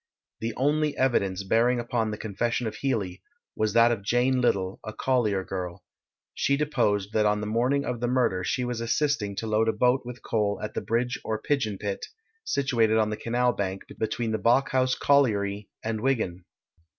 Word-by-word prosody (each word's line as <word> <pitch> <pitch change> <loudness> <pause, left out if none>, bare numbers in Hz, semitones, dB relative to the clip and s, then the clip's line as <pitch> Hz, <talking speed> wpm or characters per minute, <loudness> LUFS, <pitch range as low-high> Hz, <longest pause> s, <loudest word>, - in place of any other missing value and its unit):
The 115 0 -3
only 150 +2 +1
evidence 100 -7 +1
bearing 120 +5 +2
upon 120 -1 -1
the 105 - -4
confession 115 +4 -2
of 110 - -3
Healey, 100 -9 -2 0.3
was 110 -1 0
that 115 0 +6
of 115 -4 -1
Jane 125 +5 +2
Little, 95 -5 0
a 110 - -6
collier 110 -6 +1
girl. 90 -2 -5 0.5
She 140 - +1
deposed 110 -9 0
that 105 -1 +3
on 105 0 +2
the 105 - -3
morning 125 +6 +1
of 125 -2 -3
the 120 - -1
murder 120 -7 +1
she 125 +7 -1
was 120 -1 -3
assisting 115 -4 0
to 115 - -4
load 110 +1 +2
a - - +1
boat 125 +1 +2
with 125 0 -9
coal 105 -2 0
at 105 - -4
the - - -2
Bridge 120 +2 -1
or 110 -1 -2
Pigeon 110 -6 -1
Pit, 100 0 -4 0.4
situated 115 - +2
on 110 -1 +2
the - - -1
canal 120 +2 +1
bank, 95 -1 -3 0.2
between 110 +1 -1
the 110 - -1
Bawkhouse 130 +3 +2
Colliery 105 -8 +2
and 110 -1 -2
Wigan. 105 -9 -1
115 Hz, 185 wpm, -26 LUFS, 105-125 Hz, 0.5 s, that